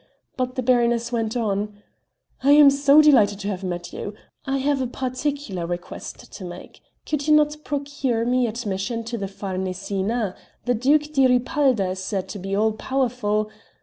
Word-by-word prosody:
But 255 -1 -2
the 255 - -2
baroness 240 -1 +2
went 230 0 -1
on: 210 -2 -1 0.7
"I 280 +2 +6
am 290 -1 +8
so 280 +2 +6
delighted 220 -9 +5
to 200 - -4
have 195 -1 -4
met 175 -1 -4
you 205 - -6 0.3
I 270 0 +1
have 275 0 +1
a 255 - 0
particular 255 - -3
request 175 0 -7
to - - -8
make: 175 0 -10 0.2
could 300 -1 -2
you 305 - +6
not 300 0 +3
procure 280 -5 -1
me 250 0 +2
admission 225 0 -3
to 235 +1 -4
the 195 - -3
Farnesina? 190 +2 -3 0.3
The 245 - +2
Duke 295 +6 +2
di 270 -3 +5
Ripalda 250 -5 +2
is 185 - -5
said 190 -1 -2
to 205 - -6
be 195 +1 -3
all 220 +2 +3
powerful...." 220 -3 -1
235 Hz, 170 wpm, -23 LUFS, 200-270 Hz, 0.7 s, am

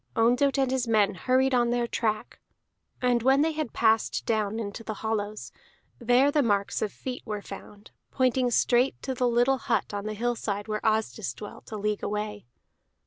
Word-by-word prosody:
Ondott 250 +5 +3
and 265 -2 +1
his 260 -2 0
men 210 -3 +3
hurried 260 +8 +1
on 240 -1 +3
their 240 0 +1
track, 215 -2 -2 0.6
and 245 -1 +3
when 265 +4 +4
they 320 - +1
had 310 -5 -3
passed 220 -1 +1
down 215 -1 0
into 215 +1 -5
the 215 -1 -5
hollows, 215 -1 -3 0.5
there 245 +4 +4
the 295 - +3
marks 205 -5 0
of 210 - -1
feet 255 -1 -6
were 210 -3 -5
found, 200 +1 -11 0.2
pointing 255 -1 +1
straight 245 +2 +2
to 265 - -2
the 250 0 +1
little 245 +3 +3
hut - - -1
on 205 0 -4
the 215 - -3
hillside 220 -3 -2
where 215 -1 -3
Asdis 215 - 0
dwelt, 205 - -10
a 215 - -4
league 210 0 -1
away. 210 - -4
230 Hz, 180 wpm, -27 LUFS, 210-250 Hz, 0.6 s, when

